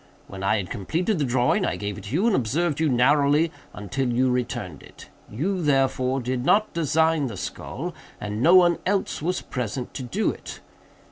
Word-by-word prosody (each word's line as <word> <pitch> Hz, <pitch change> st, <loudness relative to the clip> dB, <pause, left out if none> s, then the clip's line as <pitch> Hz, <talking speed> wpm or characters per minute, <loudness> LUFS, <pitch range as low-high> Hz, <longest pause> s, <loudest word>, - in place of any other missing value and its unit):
When 95 Hz, -, -9 dB
I 105 Hz, +3 st, +2 dB
had 95 Hz, -4 st, -4 dB
completed 170 Hz, -, -1 dB
the 145 Hz, -, +1 dB
drawing 125 Hz, 0 st, +2 dB
I -, -, 0 dB
gave 100 Hz, -1 st, -4 dB
it 100 Hz, -, -10 dB
to 100 Hz, -, -7 dB
you, 190 Hz, +7 st, +2 dB
and 230 Hz, -4 st, +3 dB
observed 150 Hz, +6 st, 0 dB
you 160 Hz, -1 st, +2 dB
narrowly 145 Hz, +5 st, +3 dB, 0.2 s
until 125 Hz, +6 st, -3 dB
you 125 Hz, +2 st, +2 dB
returned 115 Hz, -, -3 dB
it. -, -, -14 dB, 0.2 s
You, 180 Hz, -, -2 dB
therefore, 135 Hz, -3 st, +1 dB
did 125 Hz, 0 st, -2 dB
not 215 Hz, +9 st, +3 dB
design 160 Hz, -2 st, +2 dB
the 110 Hz, -5 st, -7 dB
skull, -, -, -5 dB, 0.3 s
and 105 Hz, +1 st, -4 dB
no 170 Hz, +7 st, +6 dB
one 175 Hz, -2 st, +5 dB
else 195 Hz, -5 st, -1 dB
was 180 Hz, +4 st, -1 dB
present 125 Hz, 0 st, -4 dB
to -, -, -5 dB
do 160 Hz, -, 0 dB
it. -, -, -9 dB
135 Hz, 190 wpm, -24 LUFS, 120-165 Hz, 0.3 s, no